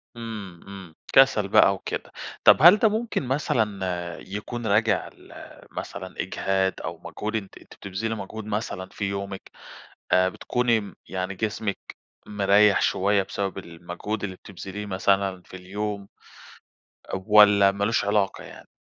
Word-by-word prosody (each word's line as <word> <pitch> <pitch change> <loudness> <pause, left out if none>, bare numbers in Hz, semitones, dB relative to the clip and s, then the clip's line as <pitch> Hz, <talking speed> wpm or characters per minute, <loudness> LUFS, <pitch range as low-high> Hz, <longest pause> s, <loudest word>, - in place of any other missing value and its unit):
امم، 105 -6 -7
امم، 95 -4 -10 0.2
كسل 135 -7 +5
بقى 100 0 +5
وكده. - - -6 0.3
طب، - - +8
هل 175 +5 +9
ده 220 +1 +4
ممكن 220 -2 -2
مثلًا 100 - -1
يكون 110 +4 -6
راجع 110 +2 +2
لمثلًا 95 0 -9
إجهاد؟ 95 0 -1
أو 85 - -5
مجهود 105 +6 -4
أنتِ 100 -3 -5
أنتِ - - -16
بتبذلي 105 +4 -4
موجهود 110 +1 -7
مثلًا 105 -3 -4
في 100 - -4
يومِك؟ 100 0 -6 0.6
آآ، 95 0 +5
بتكوني 115 +1 -1
يعني 95 +2 -3
جسمِك 105 0 -4 0.3
مريح 100 0 +4
شويّة 100 +1 +2
بسبب 95 0 -4
المجهود 90 +5 -6
اللي 95 -2 -5
بتبذليه 100 +2 -8
مثلًا 95 -1 0
في 95 - -12
اليوم؟ 100 +2 -5 1.1
والّا 100 0 +6
مالوش 100 +2 0
علاقة 100 -1 0
يعني؟ - - -13
100 Hz, 130 wpm, -25 LUFS, 95-105 Hz, 1.1 s, هل